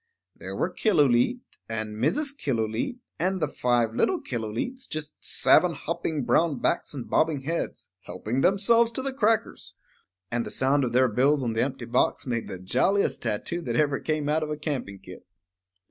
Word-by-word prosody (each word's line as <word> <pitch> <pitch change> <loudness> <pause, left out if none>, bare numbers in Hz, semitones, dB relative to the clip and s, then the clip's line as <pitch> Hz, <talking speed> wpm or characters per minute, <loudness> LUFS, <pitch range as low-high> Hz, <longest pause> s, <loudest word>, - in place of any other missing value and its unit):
There - - -7
were - - -1
Killooleet, 165 - +3 0.3
and 110 -1 -4
Mrs. 200 - 0
Killooleet, 115 - -2 0.2
and 185 +3 0
the 155 - +1
five 120 -5 +1
little 365 - +1
Killooleets, 120 - -4
just 155 -1 -4
seven 180 -2 +4
hopping 155 -1 -3
brown 160 +3 +2
backs - - -1
and 130 - -6
bobbing 155 -3 +1
heads, 165 +5 -4 0.2
helping 110 +8 -3
themselves 225 +6 +3
to 260 - -3
the 270 0 -2
crackers. 225 -3 0 0.6
And 120 0 0
the - - -6
sound 135 +2 +2
of 120 - -3
their 130 +1 +5
bills 135 +5 +2
on 115 -2 -1
the 110 - 0
empty 130 -2 -2
box 125 +2 +1
made 120 -3 -2
the - - -6
jolliest 130 - +1
tattoo 170 +11 -2
that - - -3
ever 145 -3 +2
came 155 -2 -2
out 155 +2 +1
of 155 - -3
a 150 - -3
camping 140 -10 -4
kit. 90 -1 -12
145 Hz, 175 wpm, -26 LUFS, 120-170 Hz, 0.6 s, their